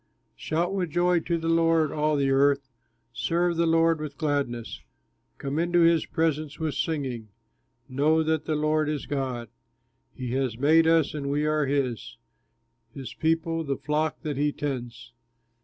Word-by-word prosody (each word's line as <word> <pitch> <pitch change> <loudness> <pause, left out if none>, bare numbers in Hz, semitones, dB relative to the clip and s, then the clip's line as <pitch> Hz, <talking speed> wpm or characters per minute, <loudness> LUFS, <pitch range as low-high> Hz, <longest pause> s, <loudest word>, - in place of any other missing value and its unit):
Shout 170 +4 -1
with 185 -4 -1
joy 175 +2 +2
to 170 +1 -1
the 165 0 -4
Lord, 165 -2 +3
all 150 0 +1
the 140 -1 +1
earth, 140 0 +3 0.5
Serve 170 +7 0
the 170 0 +1
Lord 165 -1 +3
with 145 -2 -6
gladness, 140 -7 -2 0.6
Come 140 +3 -3
into 175 +1 +2
his 165 -1 +4
presence 155 -3 -1
with 160 -2 -2
singing, 135 -7 -3 0.6
Know 150 +5 +2
that 160 -1 0
the 155 - -1
Lord 155 0 +1
is 150 -2 -3
God, 130 -4 -3 0.7
He 125 -2 -5
has 130 -3 -1
made 160 +5 +4
us 165 -2 +3
and 140 -2 -4
we 145 +2 0
are 150 -1 +1
his, 130 -6 -2 0.8
His 135 -3 -7
people, 165 0 0
the 140 -3 -2
flock 150 +2 -1
that 150 -4 -3
he 145 +1 +1
tends. 120 -5 -5
150 Hz, 155 wpm, -26 LUFS, 140-165 Hz, 0.8 s, his